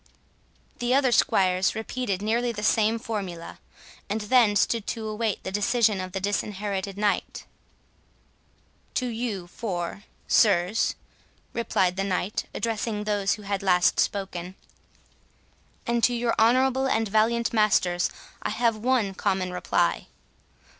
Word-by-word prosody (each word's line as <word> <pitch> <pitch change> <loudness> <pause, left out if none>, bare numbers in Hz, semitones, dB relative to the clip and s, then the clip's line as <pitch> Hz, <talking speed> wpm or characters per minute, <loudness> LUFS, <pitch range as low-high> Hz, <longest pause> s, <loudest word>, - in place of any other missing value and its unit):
The 245 +1 +1
other 270 -2 +3
squires 185 -4 +2
repeated 220 -3 -3
nearly 235 +3 +1
the 210 -2 -6
same 220 +1 +3
formula, 200 -8 -6 0.5
and 215 +2 -1
then 215 -1 +4
stood 215 +1 +1
to 225 -2 -3
await 215 -1 -2
the 190 - -4
decision 205 0 +2
of 185 0 -6
the 190 - -3
Disinherited 200 0 -3
Knight. 205 -1 -1 1.5
"To 255 - 0
you 225 -6 -3
four, 180 0 -5 0.2
sirs," 200 -1 +3 0.6
replied 190 -5 0
the 195 - 0
Knight, 195 +1 -2
addressing 220 -2 -2
those 205 -2 +1
who 210 - -8
had 200 -1 -2
last 180 -2 +3
spoken, 185 -2 -2 1.3
"and 235 0 0
to 245 +3 +4
your 235 0 0
honourable 260 +3 +3
and 225 -3 +1
valiant 225 +3 +1
masters, 185 -5 +2 0.3
I - - -2
have 230 +1 +1
one 225 -3 +1
common 190 -1 -1
reply. 180 - 0
210 Hz, 125 wpm, -26 LUFS, 195-230 Hz, 1.5 s, then